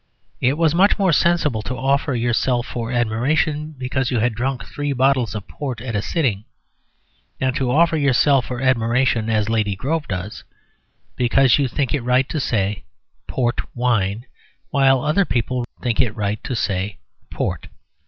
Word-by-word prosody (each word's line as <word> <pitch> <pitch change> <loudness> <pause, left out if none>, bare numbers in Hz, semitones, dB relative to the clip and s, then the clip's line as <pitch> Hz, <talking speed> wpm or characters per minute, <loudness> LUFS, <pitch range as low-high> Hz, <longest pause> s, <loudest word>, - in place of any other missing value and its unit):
It 130 +4 +1
was 160 -2 +3
much 190 +4 +4
more 190 -5 +2
sensible 150 -8 +2
to 125 +4 -4
offer 140 +1 +1
yourself 120 +1 +1
for 120 -1 -5
admiration 145 +6 0
because 130 0 -1
you 125 - 0
had 115 +1 +1
drunk 125 +1 -3
three 145 -1 -3
bottles 130 -3 +1
of 105 -2 -6
port 135 -6 -5
at 115 -1 -5
a 100 - +1
sitting, 115 - -1 0.9
than 130 -1 0
to 130 -2 -1
offer 165 +5 +3
yourself 140 -2 +3
for 125 -1 -4
admiration 120 -2 +1
(as 105 -2 +1
Lady 110 -3 0
Grove 150 +9 -2
does) 95 +2 -5 0.7
because 125 +2 +3
you 140 - +2
think 130 +1 -2
it 145 - 0
right 125 +2 +2
to 155 - -2
say 105 -6 -1 0.4
"port 120 -2 -1
wine" 115 -3 0 0.5
while 135 -2 +4
other 155 +7 +2
people 125 -4 -1 0.2
think 120 -3 +1
it 110 -4 -1
right 105 -1 -2
to 125 - -3
say 100 -2 -2 0.3
"port." - - -3
125 Hz, 165 wpm, -21 LUFS, 115-140 Hz, 0.9 s, much